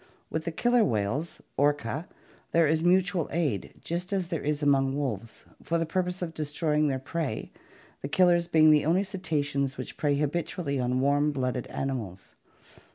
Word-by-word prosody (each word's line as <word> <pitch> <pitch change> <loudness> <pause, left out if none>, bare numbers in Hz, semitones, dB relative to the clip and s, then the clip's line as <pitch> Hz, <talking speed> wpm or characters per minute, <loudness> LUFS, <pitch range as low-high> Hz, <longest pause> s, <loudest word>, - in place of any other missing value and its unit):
With 160 0 -2
the 170 - -1
killer 240 +7 +3
whales, 120 - -1
Orca 145 0 +2
(Fig. 135 +7 -3
64), - - -28
there 165 0 +5
is 160 +2 +2
mutual 180 -1 +2
aid 145 - -1
just 175 +3 -4
as 190 -3 -1
there 165 -4 -2
is 150 0 -1
among 135 -1 +3
wolves, 115 -6 -4 0.2
for 170 - 0
the 165 - 0
purpose 180 +2 -1
of 165 -2 -4
destroying 150 0 0
their 135 -2 0
prey, 135 -2 -4 0.5
the - - -3
killers 175 +2 +3
being 155 -2 +6
the 150 -1 +5
only 175 +5 +2
cetaceans 145 -8 -2
which 130 - -6
prey 145 -2 +1
habitually 150 0 -1
on 125 +1 0
warm 145 +2 +3
blooded 130 -3 -2
animals. 110 -9 -5
150 Hz, 170 wpm, -28 LUFS, 135-170 Hz, 0.5 s, being